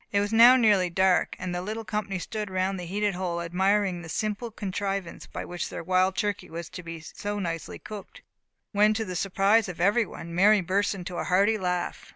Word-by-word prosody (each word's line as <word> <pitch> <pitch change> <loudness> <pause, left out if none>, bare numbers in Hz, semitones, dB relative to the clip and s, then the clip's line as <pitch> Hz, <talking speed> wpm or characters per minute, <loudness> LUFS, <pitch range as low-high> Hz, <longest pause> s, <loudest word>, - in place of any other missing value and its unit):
It 200 - +2
was 205 +2 -1
now 235 +3 +9
nearly 205 -7 +4
dark. 190 +1 +2
The 180 -1 -3
little 220 +4 -5
company 210 -3 -2
stood 210 +3 -4
around 185 +1 -1
the 180 - -6
heated 205 +2 0
hole, 175 -1 -2
admiring 190 +2 +1
the 165 - -10
simple 215 +6 -2
contrivance 195 -3 -4
by - - -6
which 175 -1 -4
their - - -6
wild 185 +2 +2
turkey 205 -4 -2
was 165 +1 -6
to 180 0 -8
be 165 -1 -8
so 205 +6 -5
nicely 165 -4 -4
cooked, 215 - -10 0.5
when, 210 +1 +4
to 220 0 -1
the 185 -2 -5
surprise 195 +3 +2
of 180 - -7
every 205 +5 +3
one, 170 0 -9
Mary 200 +4 +5
burst 195 +3 0
into 180 -2 -6
a - - -2
hearty 200 +4 +3
laugh. 180 -1 -2
195 Hz, 200 wpm, -27 LUFS, 180-210 Hz, 0.5 s, now